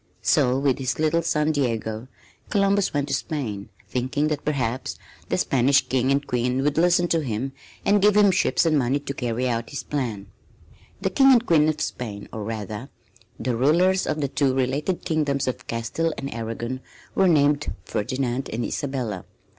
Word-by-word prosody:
So, 125 +1 +3
with 135 -1 +1
his 130 -1 -1
little 155 +2 +2
son, 155 -1 +1
Diego, 115 -5 -2 0.4
Columbus 200 -1 +2
went 145 -1 -1
to - - -1
Spain, 110 - -3 0.2
thinking 130 +4 -1
that 150 -2 -2
perhaps 130 -4 -2 0.3
the - - +1
Spanish 135 +2 +3
King 130 0 +1
and 140 +1 +1
Queen 125 +2 0
would 145 +2 +1
listen 175 0 +4
to 165 - +2
him, 130 0 -3 0.3
and 205 0 +4
give 210 +1 +5
him 205 -2 +6
ships 185 -1 +2
and 155 -3 +3
money 130 +2 +1
to 140 -1 -5
carry 125 -1 -2
out 115 -1 -2
his 140 - -5
plan. 120 -9 -3 0.8
The 190 - 0
King 270 +5 +6
and 240 -1 +4
Queen 155 -5 +4
of 155 - -2
Spain, 105 -4 -4
or 110 - -4
rather 110 +3 -5 0.5
the 125 -2 -1
rulers 175 +9 +3
of 155 0 -1
the 140 - +1
two 135 -1 +1
related 135 +7 -1
kingdoms 145 -4 0
of 130 - -4
Castile 135 +8 -2
and 140 0 -5
Aragon, 115 +2 -4 0.3
were 195 - +3
named 145 -3 +3
Ferdinand 125 +5 -2
and 115 +2 -2
Isabella. 125 -9 -3
135 Hz, 175 wpm, -24 LUFS, 120-155 Hz, 0.8 s, him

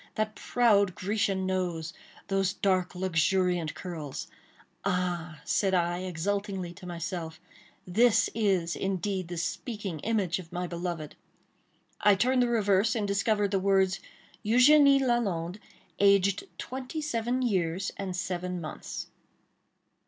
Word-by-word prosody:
—that 215 0 -1
proud 205 -7 +2
Grecian 195 -1 0
nose!—those 185 +1 -2
dark 185 -3 0
luxuriant 180 -1 +1
curls!—"Ah!" 175 +1 -5
said 190 -2 +2
I, 175 0 +1
exultingly 185 +1 -3
to 180 0 -11
myself, 170 -1 -5 0.5
"this 225 +5 +4
is 190 -6 +1
indeed 190 -1 -2
the 175 0 -6
speaking 200 -1 -4
image 195 -3 0
of 165 -3 -11
my 180 +1 -3
beloved!" 170 -3 -4 0.8
I 205 -1 +5
turned 250 +5 +2
the 245 - +3
reverse, 210 -2 +2
and 210 -3 -1
discovered 200 0 +1
the 195 - +2
words—"Eugénie 230 +8 +3
Lalande—aged 200 -2 +1
twenty 260 +4 -5
seven 245 -2 -1
years 190 -4 0
and 190 -2 -4
seven 180 0 -3
months." 155 -2 -6
190 Hz, 110 wpm, -29 LUFS, 175-210 Hz, 0.8 s, I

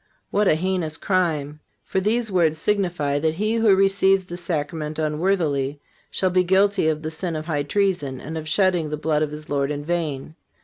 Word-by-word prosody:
What 205 0 +2
a 155 - +5
heinous 170 -2 -1
crime! 155 -7 -1 0.3
For 190 - -1
these 225 +2 0
words 165 -4 +2
signify 175 -6 0
that 160 +1 0
he 215 +5 0
who 220 -4 +5
receives 195 0 +3
the 175 - -7
Sacrament 155 -3 -3
unworthily 150 -3 0 0.3
shall 185 -1 0
be 180 0 +3
guilty 190 0 +3
of 155 0 0
the 155 - -3
sin 165 +1 -4
of 155 0 -4
high 155 -3 -1
treason, 145 -5 0
and 160 +4 -7
of 155 -1 -5
shedding 180 -3 +2
the 150 - -3
blood 150 0 0
of 155 - 0
his 150 0 -8
Lord 140 -1 0
in 145 0 -4
vain. 155 -4 -2
160 Hz, 190 wpm, -23 LUFS, 150-190 Hz, 0.3 s, a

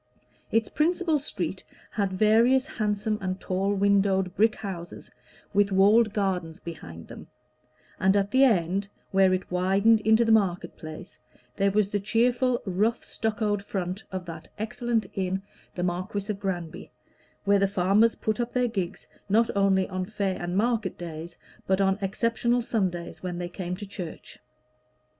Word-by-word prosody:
Its 225 -1 +2
principal 330 0 +1
street 285 - -4 0.3
had 200 -3 -1
various 225 +7 +4
handsome 210 -5 -1
and 185 0 -3
tall 190 +2 -1
windowed 195 -2 +2
brick 220 +1 +3
houses 180 -5 -7 0.4
with 205 0 +3
walled 210 +4 +5
gardens 185 -6 -2
behind 85 - -9
them; - - -11 0.7
and 190 +2 +4
at 200 0 0
the 260 +1 +5
end, 195 -4 +2 0.2
where 190 -1 +4
it 185 0 -2
widened 195 +5 +3
into 220 +2 +4
the 225 - +2
market 185 -5 +2
place, 155 -1 -10 0.4
there 200 0 +2
was 200 0 +2
the 205 - -1
cheerful 240 +4 +2
rough 210 +5 0
stuccoed 210 -2 -1
front 190 0 -4
of 185 -1 -4
that 165 -2 -8
excellent 225 +1 -1
inn, 190 0 -2 0.3
the 180 - -2
Marquis 185 +4 -2
of 200 - -6
Granby, 175 -5 -4 0.5
where 200 0 +4
the 195 - +3
farmers 200 +4 +3
put 215 0 -2
up 240 0 -2
their 250 -1 +2
gigs, 195 -5 -4 0.2
not 225 +3 +3
only 195 -1 +3
on 185 -1 -3
fair 195 -2 -2
and 175 +1 -2
market 225 -2 0
days, 165 0 -7 0.3
but 190 0 +2
on 195 0 +2
exceptional 230 +4 0
Sundays 185 -7 -2
when 180 -1 -4
they 175 0 -3
came 180 0 -4
to 205 +3 -7
church. 185 -4 -8
200 Hz, 155 wpm, -27 LUFS, 185-220 Hz, 0.7 s, walled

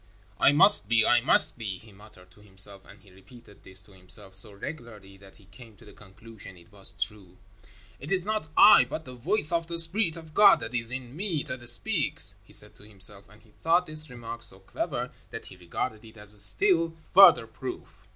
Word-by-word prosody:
"I - - +4
must 160 - +5
be, 115 -1 +2
I 120 0 +2
must 120 - +3
be," 100 -5 -6
he 110 +3 -19
muttered 95 -3 -19
to 95 - -23
himself, 100 -1 -1
and 100 - -18
he 100 -1 -22
repeated 100 +2 -20
this 95 +1 -8
to 105 - -22
himself 95 +1 -7
so 95 +2 -4
regularly 105 -3 -11
that 95 0 -19
he 100 - -23
came 110 +2 -18
to 115 - -20
the 105 - -17
conclusion 105 -1 -14
it 85 +1 -22
was 100 -2 -4
true. 100 -3 -5 0.6
"It 145 +6 -11
is 190 -2 -2
not 215 -5 -4
I, - - +6
but 155 +5 -8
the 130 - -12
voice 145 - +3
of 170 -1 -2
the 170 0 -6
Spirit 170 +1 +4
of 160 -2 -14
God 205 +4 +5
that 115 - -8
is 115 -1 +2
in 130 0 -8
me 175 -4 -4
that 120 -2 -1
speaks," 120 - +1
he - - -23
said - - +2
to - - -19
himself, 100 -1 -1
and 105 0 -22
he 110 - -26
thought 170 +2 +1
this 155 -1 -1
remark 120 -1 -10
so 115 -5 -17
clever 125 - -6 0.2
that 115 - -10
he - - -14
regarded 90 +5 -7
it 110 0 -17
as 105 -1 -6
still 165 - +2 0.2
further - - +6
proof. - - -11
115 Hz, 210 wpm, -25 LUFS, 100-145 Hz, 0.6 s, I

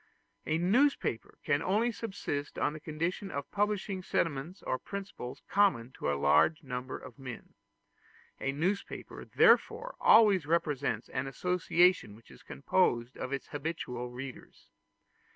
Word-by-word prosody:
A 155 - +1
newspaper 200 - +1
can 145 +1 +1
only 215 +7 +1
subsist 195 -10 -4
on - - +1
the 155 - -7
condition 165 +6 -3
of 140 -4 -5
publishing 205 -2 -1
sentiments 165 0 -2
or 130 - -1
principles 195 -11 -7
common 160 - +2
to 70 - -2
a 70 - -1
large 75 - +3
number 130 -1 -5
of 130 +1 -12
men. 130 -3 -9 0.9
A 135 - -1
newspaper 180 +8 -3
therefore 475 +3 +3
always 200 -8 +6
represents 145 -8 0
an 130 +1 -3
association 180 - +2
which 115 - -18
is - - -15
composed 125 -6 0
of 130 - -5
its 140 -1 -4
habitual 140 -5 -4
readers. 125 +2 -10
155 Hz, 135 wpm, -31 LUFS, 130-190 Hz, 0.9 s, always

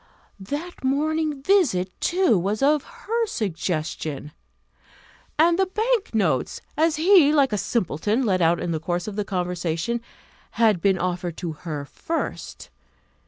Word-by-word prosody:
That 290 - -6
morning 300 +1 0
visit, 270 - +2
too, 360 - +3
was 200 +6 0
of 295 0 +3 0.2
her 460 +1 +1
suggestion; 160 - -3 1.1
and 335 +3 +4
the 385 - +3
bank 435 - 0
notes, 165 - +1 0.2
as 320 +1 +2
he, 330 -2 +6
like 280 -6 +3
a - - +1
simpleton, 210 - 0
let 185 -4 +1
out 170 +1 +3
in 175 - -2
the 160 - -1
course 175 +3 -2
of 210 - -5
the 210 - -1
conversation, 180 +3 -2 0.5
had 215 -6 +3
been 195 0 +3
offered 175 -1 -3
to 175 -3 -4
her 150 -2 -6
first. 325 - -5
215 Hz, 140 wpm, -24 LUFS, -, 1.1 s, he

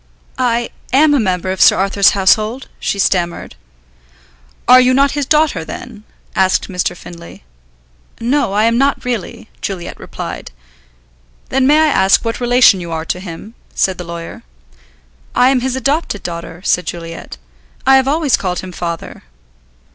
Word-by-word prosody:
"I 240 -2 0 0.2
am 290 +3 +4
a 285 - +3
member 185 -3 -1
of 190 - -3
Sir - - +6
Arthur's 195 +1 +3
household," 215 +6 +2
she - - -2
stammered. 175 -3 -1 1.1
"Are 255 +1 +8
you 255 0 +3
not 275 +1 +3
his 290 -2 -2
daughter, 305 - +2
then?" 215 +5 -9 0.3
asked 190 +1 +1
Mr. 180 -1 -2
Findlay. 170 - -12 0.8
"No, 245 -2 0
I 210 +1 +2
am 230 +1 +2
not 275 -1 +1
really," 230 -1 -4
Juliet 180 -3 -5
replied. - - -7 1.0
"Then 265 -1 +2
may 295 +2 +5
I 315 - +4
ask 195 -4 +3
what 230 - -2
relation 245 -5 +5
you 170 -1 -7
are 160 0 -3
to 180 - -3
him?" 185 +4 -9 0.2
said 190 -2 0
the - - -4
lawyer. 170 -1 -8 0.9
"I 250 +1 +5
am 265 - +2
his 260 0 -1
adopted 275 -4 -1
daughter," 170 0 -7
said 180 - +1
Juliet. 165 -1 -7 0.5
"I 270 0 +6
have 265 0 +1
always 295 -2 +2
called 180 -2 -3
him 185 - -8
'Father.'" 170 -2 -6
215 Hz, 155 wpm, -16 LUFS, 180-255 Hz, 1.1 s, Are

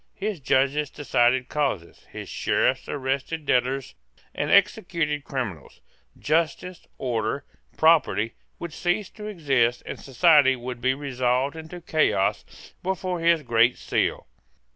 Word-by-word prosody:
His 205 -3 -3
judges 140 +2 +1
decided 125 -3 +1
causes. 135 - -3
His - - -7
Sheriffs - - 0
arrested 140 +3 -3
debtors 130 +1 0 0.4
and - - -2
executed 150 -5 +2
criminals. 115 - -5 0.4
Justice, 165 +3 -1
order, 120 -3 -2 0.3
property, 130 - +3 0.2
would 170 -2 -7
cease 185 +3 -1
to 210 -1 -9
exist, 135 - +1
and - - -6
society 135 0 +4
would 125 -1 -7
be 130 +1 +2
resolved 130 0 -1
into 160 +2 -9
chaos, 155 - -1
but 190 +1 -1
for 180 -1 -3
his 165 -1 +3
Great 120 0 +3
Seal. - - -1
140 Hz, 120 wpm, -25 LUFS, 125-165 Hz, 0.4 s, society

